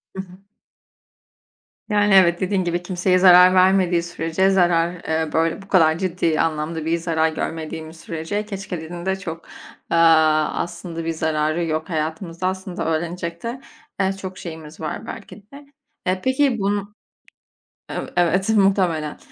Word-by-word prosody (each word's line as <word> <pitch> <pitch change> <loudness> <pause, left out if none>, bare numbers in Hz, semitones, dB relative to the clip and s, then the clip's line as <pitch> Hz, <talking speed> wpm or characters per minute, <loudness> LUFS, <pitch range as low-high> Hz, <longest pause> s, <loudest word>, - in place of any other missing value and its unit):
Hı 190 - -3
hı. 185 -1 -14 1.5
Yani 205 -1 +3
evet, 175 -3 +5
dediğin 185 0 0
gibi 175 0 -2
kimseye 185 0 +1
zarar 180 0 +8
vermediği 185 -2 +3
sürece 170 +2 0
zarar, 175 -2 +2
eee, 160 0 -1
böyle, 165 +4 0
bu 195 - -15
kadar 165 -5 +4
ciddi 170 -4 0
anlamda 160 0 -2
bir 165 +1 +1
zarar 160 -1 0
görmediğimiz 160 0 -5
sürece 165 +6 -4
keşkelerin 175 -4 -6
de 190 0 +1
çok, 170 -3 -7 0.5
eee, 170 - +3
aslında 165 +1 +2
bir 165 - 0
zararı 155 +1 0
yok. 160 +2 -3
Hayatımızda 165 +2 -3
aslında 185 -2 -4
öğrenecek 170 +1 -3
de, 240 +3 -5 0.4
eee, 190 0 +1
çok 190 -1 -8
şeyimiz 160 -2 -9
var 190 +7 -5
belki 215 - -8 0.2
de. 285 +1 -12 0.4
Eee, 185 0 0
peki 260 -2 +2
bun 205 +1 -2 1.0
Ev - - -4
evet, 185 +4 +2
muhtemelen. 190 -7 +2
175 Hz, 140 wpm, -21 LUFS, 160-190 Hz, 1.5 s, zarar